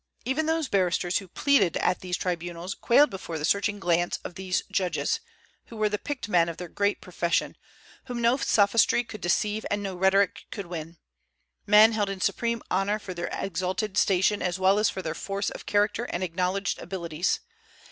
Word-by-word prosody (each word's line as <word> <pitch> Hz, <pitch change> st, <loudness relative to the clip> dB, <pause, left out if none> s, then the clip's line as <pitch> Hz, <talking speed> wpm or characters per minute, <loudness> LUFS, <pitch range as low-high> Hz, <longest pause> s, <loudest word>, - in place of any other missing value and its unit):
Even 300 Hz, +5 st, 0 dB
those 320 Hz, -2 st, 0 dB
barristers 180 Hz, -3 st, +1 dB
who 195 Hz, -, -11 dB
pleaded 205 Hz, -, +2 dB
at 180 Hz, -, +1 dB
these 180 Hz, -1 st, -3 dB
tribunals 175 Hz, +1 st, -3 dB
quailed 290 Hz, +5 st, +4 dB
before 180 Hz, -4 st, -5 dB
the 150 Hz, -, -2 dB
searching 205 Hz, +3 st, +1 dB
glance 175 Hz, -1 st, +1 dB
of -, -, -7 dB
these 185 Hz, 0 st, -2 dB
judges, 195 Hz, -, 0 dB, 0.5 s
who 230 Hz, -, -11 dB
were 215 Hz, -1 st, +2 dB
the 210 Hz, 0 st, -2 dB
picked 275 Hz, -8 st, -5 dB
men 170 Hz, -4 st, +3 dB
of 165 Hz, -, -6 dB
their 180 Hz, -, -6 dB
great 200 Hz, +4 st, -1 dB
profession, 175 Hz, -2 st, -1 dB, 0.5 s
whom 245 Hz, -2 st, -5 dB
no 235 Hz, +1 st, +3 dB
sophistry 225 Hz, 0 st, +3 dB
could 215 Hz, -4 st, -10 dB
deceive 210 Hz, +5 st, 0 dB
and 205 Hz, 0 st, -1 dB
no 195 Hz, -1 st, -3 dB
rhetoric 190 Hz, +2 st, +2 dB
could 200 Hz, -3 st, -6 dB
win, 165 Hz, -1 st, -7 dB, 0.7 s
men 210 Hz, +2 st, +7 dB
held 210 Hz, -3 st, 0 dB
in 195 Hz, -1 st, -4 dB
supreme 235 Hz, +4 st, -1 dB
honor 195 Hz, +3 st, +1 dB
for 195 Hz, -3 st, -7 dB
their 175 Hz, 0 st, -4 dB
exalted 190 Hz, +3 st, -2 dB
station 195 Hz, +2 st, +2 dB
as 180 Hz, 0 st, -1 dB
well 190 Hz, +2 st, +3 dB
as 210 Hz, -, +3 dB
for 190 Hz, -, -5 dB
their 160 Hz, -, -2 dB
force 200 Hz, +3 st, -3 dB
of -, -, -10 dB
character 210 Hz, +3 st, +1 dB
and 180 Hz, -5 st, -3 dB
acknowledged 185 Hz, +3 st, -1 dB
abilities. 170 Hz, -2 st, -2 dB
195 Hz, 185 wpm, -27 LUFS, 180-210 Hz, 0.7 s, men